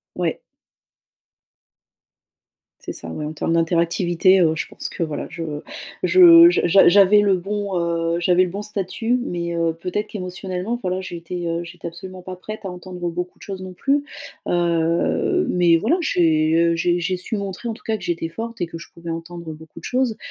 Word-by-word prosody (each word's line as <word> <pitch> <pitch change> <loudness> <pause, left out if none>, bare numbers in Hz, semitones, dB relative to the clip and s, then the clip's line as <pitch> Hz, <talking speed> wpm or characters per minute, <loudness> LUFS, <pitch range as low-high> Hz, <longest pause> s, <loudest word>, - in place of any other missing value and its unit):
Ouais. - - -1 2.5
C'est - - -4
ça, 85 - -9
ouais, 150 - -5
en 150 - -4
termes 160 - -2
d'interactivité, 170 +3 +3
heu, 160 -2 +3
je - - -3
pense - - -4
que 170 - -3
voilà 155 -2 -5
je 170 -2 -5 0.6
je 340 -2 +8
j'a - - +1
j'a 190 +3 +6
j'avais 200 +2 +6
le 200 -2 +3
bon, 200 0 -3
heu, 170 0 0
j'avais 180 +1 +3
le 180 - +1
bon 200 +3 -5
statut, 210 +4 -2
mais, 170 -6 -3
heu, 165 -1 +1
peut-être 210 +4 -3
qu'émotionnellement, 185 +3 -4
voilà, 185 0 -1
j'étais, 175 -1 -6
heu, 170 +1 -1
j'étais 175 0 -9
absolument 185 +2 -8
pas 185 +1 -7
prête 215 +4 -9
à 190 - -3
entendre, 180 0 -7
heu, - - +1
beaucoup 180 +1 -5
de - - -19
choses 190 -2 -6
non 185 - -7
plus. 280 +9 0 0.4
Heu, 175 - +1
mais 175 -2 +4
voilà, 225 - +2
j'ai, 160 - +2
heu, 170 0 +3
j'ai 175 +1 +1
j'ai 180 +2 -1
su 195 +5 -4
montrer, 200 +3 -5
en - - -1
tout 245 - -18
cas, 220 - 0
que - - -13
j'étais 170 -1 -2
forte 230 +6 -7
et 175 - 0
que 165 0 -8
je 165 - -11
pouvais 170 0 -8
entendre 165 0 -6
beaucoup 160 +1 -12
de 165 - -14
choses. 250 -3 0
180 Hz, 195 wpm, -21 LUFS, 170-200 Hz, 2.5 s, je